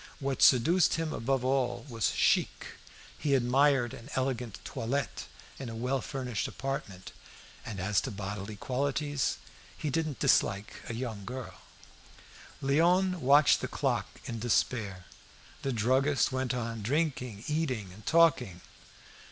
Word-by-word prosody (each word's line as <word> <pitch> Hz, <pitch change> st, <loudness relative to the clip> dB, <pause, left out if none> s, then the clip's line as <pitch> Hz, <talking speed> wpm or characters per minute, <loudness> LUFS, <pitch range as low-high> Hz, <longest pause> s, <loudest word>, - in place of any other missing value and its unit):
What 135 Hz, -1 st, -2 dB
seduced 155 Hz, +7 st, +5 dB
him 160 Hz, -1 st, -2 dB
above 130 Hz, +2 st, -1 dB
all 130 Hz, -1 st, +1 dB
else 145 Hz, -, -15 dB
was 115 Hz, -4 st, +1 dB
chic. -, -, +2 dB, 0.5 s
He 140 Hz, -2 st, +2 dB
admired 130 Hz, 0 st, +3 dB
an 115 Hz, -, -10 dB
elegant 125 Hz, -5 st, -2 dB
toilette 125 Hz, +3 st, -3 dB, 0.3 s
in 135 Hz, -3 st, -5 dB
a 115 Hz, -, -6 dB
well 125 Hz, +3 st, -1 dB
furnished 125 Hz, -6 st, -3 dB
apartment, 135 Hz, -9 st, -5 dB, 0.5 s
and 105 Hz, -4 st, -6 dB
as 100 Hz, +2 st, +1 dB
to -, -, -4 dB
bodily 100 Hz, 0 st, -5 dB
qualities, 140 Hz, +4 st, -1 dB, 0.4 s
he 150 Hz, -, -2 dB
didn't 155 Hz, -3 st, -1 dB
dislike 100 Hz, +1 st, +1 dB
a 115 Hz, -, -3 dB
young 115 Hz, -4 st, -4 dB
girl. 125 Hz, +4 st, -6 dB, 1.1 s
In -, -, -2 dB
rum. -, -, +2 dB
Léon 180 Hz, +5 st, +4 dB
watched 145 Hz, +2 st, +5 dB
the -, -, -2 dB
clock -, -, -1 dB, 0.2 s
in 115 Hz, -, -4 dB
despair. 110 Hz, -5 st, 0 dB, 0.6 s
The 135 Hz, -, -1 dB
druggist 130 Hz, +6 st, +2 dB
went 130 Hz, -1 st, -1 dB
on 115 Hz, -2 st, -3 dB
drinking, 125 Hz, -4 st, -1 dB
eating, 130 Hz, -, -2 dB
and 105 Hz, +3 st, -14 dB
talking. 130 Hz, -, +3 dB
130 Hz, 140 wpm, -30 LUFS, 115-140 Hz, 1.1 s, seduced